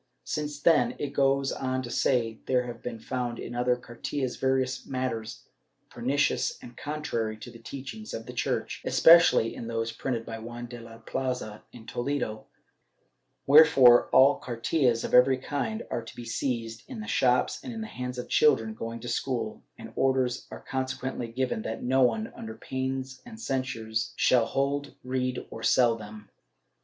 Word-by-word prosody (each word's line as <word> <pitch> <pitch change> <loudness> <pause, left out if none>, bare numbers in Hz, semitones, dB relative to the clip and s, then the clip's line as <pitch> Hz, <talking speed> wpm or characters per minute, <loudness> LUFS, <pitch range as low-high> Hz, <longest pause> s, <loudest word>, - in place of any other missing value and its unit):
Since 150 -1 -4
then, 165 - +4
it 140 -1 -4
goes 135 0 +2
on 130 0 -2
to 120 - -6
say, 115 -4 +1
there 125 -1 +2
have 120 -1 -7
been 120 -2 -5
found 120 +1 -3
in 120 - -6
other 125 +1 +2
cartillas 125 +2 -4
various 130 -1 0
matters 115 -4 -4 0.5
pernicious 140 +4 0
and 120 - -12
contrary 120 -7 -3
to 120 +3 -10
the 115 - -13
teaching 140 - -7
of 115 - -5
the 125 - -8
Church, 120 - -2
especially 165 -9 +6
in 115 - -7
those 115 0 -2
printed 120 -3 -3
by 115 0 -6
Juan 120 +2 -7
de 120 0 -9
la 115 0 -11
Plaza 115 -2 -4
in 115 -2 -13
Toledo, 120 -5 -3 1.0
where 150 +3 +9
fore 125 -6 +6
all 135 +2 +6
cartillas 120 0 0
of - - -4
every 130 +1 +6
kind 145 - -3
are 120 - -2
to 115 - -11
be 120 - -8
seized, 115 -1 -3
in 255 -4 -6
the 215 - -5
shops 125 -1 +2
and 250 - -6
in 225 -1 -5
the - - -4
hands 125 - -5
of 125 - -5
children 110 -7 +3
going 115 +1 -6
to 120 - -7
school, 120 -2 -2 0.2
and - - -10
orders 130 -2 +1
are - - -10
conse 130 -1 -2
quently 125 -3 -4
given 130 -4 -1
that 110 +1 -5
no 130 +2 +2
one, 110 -3 +1
under 110 0 -7
pains 130 +2 -4
and 225 -2 -11
censures, 125 - -2
shall 120 -3 +4
hold, 140 +1 -1
read, 130 0 -2
or - - -7
sell 120 -3 +4
them. 105 -1 -10
125 Hz, 175 wpm, -28 LUFS, 115-135 Hz, 1.0 s, where